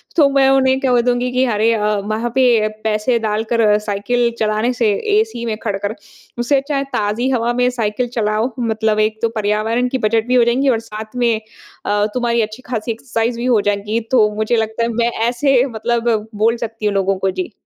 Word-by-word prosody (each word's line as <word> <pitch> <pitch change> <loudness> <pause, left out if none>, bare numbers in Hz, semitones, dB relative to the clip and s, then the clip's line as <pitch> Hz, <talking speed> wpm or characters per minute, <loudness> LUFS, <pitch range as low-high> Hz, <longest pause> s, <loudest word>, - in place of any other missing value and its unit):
तो 300 -4 +5
मैं 275 -1 +3
उन्हें 265 -1 +3
कह 250 -3 +2
दूँगी 245 +1 0
कि 255 +1 +2
अरे 220 +2 +2
अ, - - 0 0.3
वहाँ 220 +3 -2
पे 240 -5 +4 0.2
पैसे 220 +3 +1
डालकर 220 0 +1
साइकिल 235 +4 0
चलाने 215 +3 0
से, 230 -3 +1 0.3
एसी 440 - -2
में 220 -2 -2
खड़ 205 -3 -1
कर, 205 +2 -4 0.4
उससे 240 +4 +2
अच्छा 280 +2 -2
है 275 - 0
ताज़ी 215 +5 0
हवा 240 -2 0
में 250 0 +2
साइकिल 240 0 -2
चलाओ, 215 +3 0
मतलब 220 -2 0
एक 215 0 0
तो 230 - +1
पर्यावरण 215 +4 0
की 260 - -1
बजट 225 +1 0
भी 250 - +2
हो 245 - +5
जाएँगी 250 +4 +2
और 235 -3 +2
साथ 215 +2 -8
में 240 -2 +2 0.5
अ, 205 0 +1
तुम्हारी 235 -2 +1
अच्छी 220 +3 -4
ख़ासी 235 -2 -3
एक्सरसाइज़ 230 0 -2
भी 240 - -3
हो 235 -5 +3
जाएगी। 210 +2 -1
तो 220 -5 +4
मुझे 215 +2 0
लगता 220 0 -1
है 230 - 0
मैं 235 +1 +1 0.2
ऐसे 255 +1 +2
मतलब 230 -2 -1
बोल 225 +3 +2
सकती 225 -1 -7
हूँ 205 - +1
लोगों 195 0 +1
को। 190 0 0
जी। 185 +3 -5
230 Hz, 205 wpm, -18 LUFS, 215-245 Hz, 0.5 s, तो